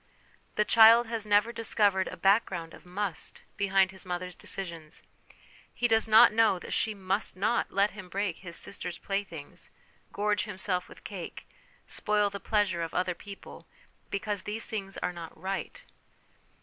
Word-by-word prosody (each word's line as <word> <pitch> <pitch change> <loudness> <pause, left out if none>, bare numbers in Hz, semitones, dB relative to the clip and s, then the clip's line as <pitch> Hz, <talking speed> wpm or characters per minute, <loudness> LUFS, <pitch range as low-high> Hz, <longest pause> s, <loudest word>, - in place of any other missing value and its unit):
The 210 - +2
child 230 +2 +8
has 225 -2 -3
never 210 +3 +4
discovered 205 -4 +2
a 185 - -7
background 190 -3 +2
of - - -14
must 185 -2 -4
behind 195 -1 +3
his 190 -1 -7
mother's 180 -1 -4
decisions; 170 -6 -7 0.7
he 240 - 0
does 225 -1 +3
not 220 -1 +8
know 220 -3 +4
that - - -7
she 220 -2 0
must 195 +2 -1
not 210 +5 +1
let 200 +1 +2
him 190 -3 -10
break 195 -2 -2
his 170 -3 -6
sister's 180 -2 -4
playthings, 195 -7 -5 0.4
gorge 210 -1 0
himself 185 -3 -2
with - - -14
cake, 190 -5 -7 0.4
spoil 210 -1 0
the 200 - -5
pleasure 205 -5 +1
of 165 -1 -4
other 180 0 +1
people, 200 +3 -11 0.4
because 200 0 -2
these 210 +3 -4
things 195 -3 -5
are 180 - -2
not 165 -2 -9
right. 190 +2 -4
195 Hz, 155 wpm, -29 LUFS, 180-210 Hz, 0.7 s, child